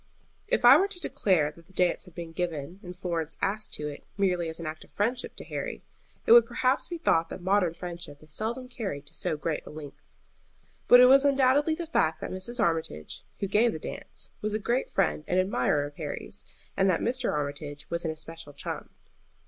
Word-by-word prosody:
If - - +1
I - - +10
were 390 - +3
to 400 -3 -3
declare 175 - +1
that 165 +1 -18
the 190 - -21
dance 180 -1 +1
had 180 -3 -16
been 170 -2 -6
given 170 0 -4
and 180 -3 -9
Florence 170 -4 -3
asked 210 +2 -1
to 150 - -4
it 145 - -7
merely 180 -4 +1
as 160 - -5
an 165 - -6
act 155 0 -5
of - - -20
friendship 235 +5 -2
to - - -6
Harry, - - -5 0.4
it - - +2
would 235 0 +9
perhaps 255 +2 +1
be 345 - -4
thought 165 - +2
that - - -6
modern 185 -2 +2
friendship 170 -5 -7
is 155 -1 -9
seldom 235 +6 -2
carried 195 - -5
to 145 - -17
so 160 0 -1
great 155 +1 -2
a - - -6
length. 150 -2 -9 0.9
But 245 - +9
it - - +10
was 270 +2 +7
undoubtedly 280 +2 +4
the 340 - -4
fact 160 - +1
that - - -4
Mrs. 190 +7 -3
Armitage, 160 - -1 0.2
who 200 - 0
gave 220 +4 +3
the - - -3
dance, - - -7
was 215 0 -1
a - - +3
great 240 +4 -1
friend 190 -5 +1
and 180 - +2
admirer 145 -5 +1
of 145 0 -10
Harry's, - - -6 0.3
and 195 0 +3
that 175 - +2
Mr. 255 +2 0
Armitage 145 0 -4
was 170 +1 -1
an 165 - -1
especial 160 -1 -8
chum. 140 - -6
180 Hz, 215 wpm, -28 LUFS, 160-230 Hz, 0.9 s, I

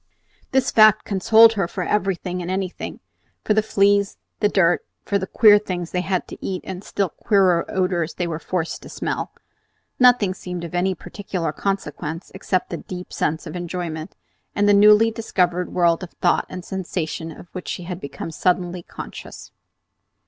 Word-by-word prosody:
This 265 -1 +1
fact 215 -1 +6
consoled 220 +3 +6
her 195 -5 0
for 185 +1 -4
everything 185 -2 -1
and 175 - -5
anything, 185 -1 -4 0.4
for 215 - +2
the 215 - +3
fleas, 200 -1 +2 0.2
the 210 - +3
dirt, 175 -4 +3 0.2
for 200 - +1
the 190 - -4
queer 210 0 +6
things 180 -4 -5
they 180 - 0
had 185 -1 -1
to - - -11
eat 185 -2 -3
and 190 -1 -6
the - - -19
still 195 -3 -1
queerer 185 -2 +2
odors 180 -3 -1
they 175 - -2
were 165 -2 -3
forced 170 -1 -3
to - - -11
smell! - - -3 0.7
Nothing 245 -7 +5
seemed 180 -2 -6
of 170 - -7
any 185 +1 +1
particular 180 -3 -4
consequence 165 -2 -4
except 190 -1 -2
the - - -2
deep 180 -1 -8
sense 160 +3 -1
of 155 - -7
enjoyment, 175 -3 -5 0.4
and 205 0 +2
the 205 - +6
newly 210 +2 +6
discovered 180 -6 -1
world 170 -1 +2
of 185 - -6
thought 175 - +1
and 180 -1 -7
sensation 175 -3 -4
of 170 +2 -13
which 185 - -7
she 180 - -4
had 180 +1 -6
become 140 +3 -6
suddenly 180 +2 0
conscious. - - -10
185 Hz, 175 wpm, -22 LUFS, 175-200 Hz, 0.7 s, fact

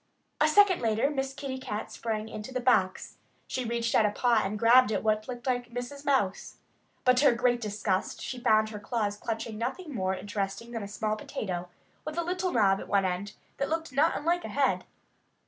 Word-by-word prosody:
A 305 - +5
second 385 +2 +5
later 225 +4 +1
Miss 270 -2 -2
Kitty 270 -1 -5
Cat 215 -4 -5
sprang 220 -2 -3
into 215 +3 -7
the 255 - -2
box. 215 -7 +1 0.3
She 255 - -3
reached 230 0 -1
out - - +5
a - - +1
paw 230 +1 +2
and 200 +2 -2
grabbed 235 +1 +6
at 200 - -1
what 215 0 +1
looked 245 -2 -7
like 245 -2 -1
Mrs. 245 +4 -6
Mouse. 235 -9 0 0.5
But 255 0 +5
to 285 - +4
her - - +8
great 240 0 +1
disgust 205 -3 -1
she 255 - -5
found 215 -2 +3
her 210 -1 -7
claws 205 -1 -1
clutching 225 0 -4
nothing 280 +7 -4
more 190 -4 0
interesting 200 +3 -4
than 230 -2 -4
a 200 - -5
small 215 +1 -2
potato, 180 -4 -5 0.3
with 310 +1 -6
a 340 - +1
little 365 +1 -1
knob 195 -5 +3
at - - -8
one 200 -1 +2
end 185 +3 -2 0.2
that 275 - -1
looked 320 -3 -2
not 300 +4 +3
unlike 340 +4 0
a - - -4
head. - - +1
230 Hz, 205 wpm, -29 LUFS, 210-265 Hz, 0.5 s, her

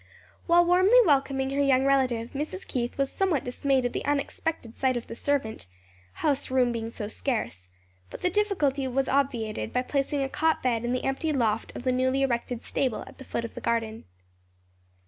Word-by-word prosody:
While 345 0 +5
warmly 370 +7 +5
welcoming 270 -3 +2
her 280 +1 +1
young 270 -1 +3
relative, 255 -4 +1
Mrs. 305 +7 -5
Keith 240 -2 -3
was 275 -1 0
somewhat 370 -9 0
dismayed 260 +1 0
at 245 - -1
the - - -3
unexpected 285 -3 -2
sight 260 -2 +1
of 235 - -5
the - - -8
servant 230 - -2 0.6
house 280 -3 +1
room 255 -2 +3
being 225 -1 -3
so 215 -2 -6
scarce; 210 - -3 0.4
but - - -9
the 360 - +2
difficulty 310 -10 +1
was 265 +1 0
obviated 235 - -1
by 250 - 0
placing 275 +1 -1
a - - -1
cot 320 +4 0
bed 240 -3 +1
in 240 - -1
the 255 - -1
empty 270 +4 0
loft 225 -6 0
of - - -6
the 255 - +2
newly 260 +2 +1
erected 240 -2 -1
stable 260 -5 -1
at - - -15
the - - -8
foot 235 -2 -3
of 230 - -8
the - - -8
garden. 225 -1 -2
265 Hz, 190 wpm, -27 LUFS, 235-280 Hz, 0.6 s, While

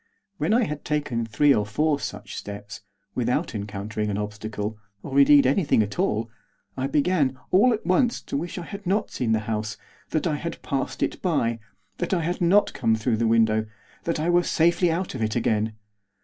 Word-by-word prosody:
When - - +1
I 240 +2 +4
had 150 -7 -4
taken 125 -7 -1
three 140 +6 +4
or 105 - +2
four 145 +8 0
such - - -6
steps, 100 0 -7 0.3
without - - 0
encountering 105 +1 -3
an 100 - -1
obstacle, 105 0 -4 0.2
or, 140 0 +1
indeed, 140 0 +7
anything 140 - +3
at 105 -1 -6
all, 110 +2 +1 0.5
I 130 +1 -1
began, 145 -2 +1
all 210 +7 +5
at 220 - -2
once, 230 +7 +2
to - - -5
wish 170 +5 -3
I 175 - -4
had 200 0 -8
not 205 +3 0
seen 120 -3 -1
the 110 -1 +2
house; 110 -1 -3 0.3
that 155 - -1
I 155 -4 0
had 170 +3 -5
passed 135 -2 -2
it - - -2
by; 120 -10 0 0.4
that 175 +2 0
I 175 - 0
had 175 +3 -2
not 195 +4 +4
come 115 - +2
through 110 +1 0
the 115 +1 +1
window; 110 -1 +3 0.4
that 165 -1 -1
I 155 - -1
were 175 0 +5
safely 170 +1 +2
out 175 +3 -2
of 130 - -5
it 110 -1 0
again. 110 -2 +1
135 Hz, 195 wpm, -25 LUFS, 110-170 Hz, 0.5 s, indeed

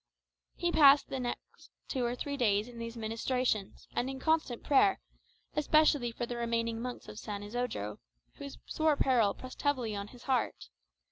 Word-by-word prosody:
He 345 -1 0
passed 285 -3 +7
the 265 - -3
next 245 -1 -6 0.2
two 255 - -1
or 240 +1 0
three 285 +3 -4
days 215 -5 +2
in 240 -1 -10
these 230 0 -6
ministrations, 225 -1 -1
and 250 - 0
in 270 0 -5
constant 310 -5 0
prayer, 380 +8 +4 0.6
especially 300 -4 +3
for 240 +1 -3
the 240 0 -5
remaining 230 -1 -1
monks 250 0 -6
of 210 - -8
San 205 -2 -5
Isodro, 210 - -3 0.4
whose 280 -1 -8
sore 315 -1 +2
peril 235 -8 +3
pressed 255 0 -9
heavily 255 -7 0
on 200 0 -4
his 245 +2 -14
heart. 225 - -1
245 Hz, 165 wpm, -32 LUFS, 225-275 Hz, 0.6 s, passed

